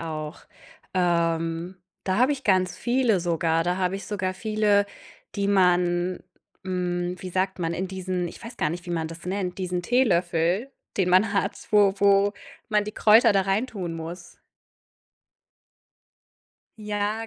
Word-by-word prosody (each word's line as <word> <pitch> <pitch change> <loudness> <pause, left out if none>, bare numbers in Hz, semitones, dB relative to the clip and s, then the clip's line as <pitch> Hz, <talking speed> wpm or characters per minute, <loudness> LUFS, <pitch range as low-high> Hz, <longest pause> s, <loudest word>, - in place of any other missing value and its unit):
auch. 155 -1 -5 0.5
Ähm, 170 0 0 0.3
da 185 0 0
habe 260 +4 +4
ich 275 -1 -6
ganz 185 -2 +2
viele 240 -6 +1
sogar. 165 -1 +1
Da 180 +1 0
habe 190 +1 0
ich 195 - -9
sogar 185 -3 -2
viele, 210 0 +2 0.5
die 200 -1 -1
man, 180 -2 +2 0.4
hm, 180 -1 -2
wie 185 +1 -7
sagt 190 +1 -1
man, 170 -1 -1
in 185 +3 -2
diesen 185 -1 -3
ich - - -12
weiß 235 +1 -9
gar 150 - 0
nicht, 175 +2 -6
wie - - -5
man 165 -2 -2
das 165 +1 -10
nennt, 185 -1 -3
diesen 180 -1 -2
Teelöffel, 180 -1 +1 0.3
den 185 -2 +1
man 200 +4 +4
hat, 200 +1 0 0.2
wo 205 -2 +5
wo 200 0 +4 0.4
man 210 -2 +2
die 210 - -6
Kräuter 220 0 +5
da 195 -1 +3
rein 195 +6 0
tun 180 -8 -5
muss. 170 +2 -8 2.4
Ja, 210 +1 -2
185 Hz, 155 wpm, -25 LUFS, 175-205 Hz, 2.4 s, wo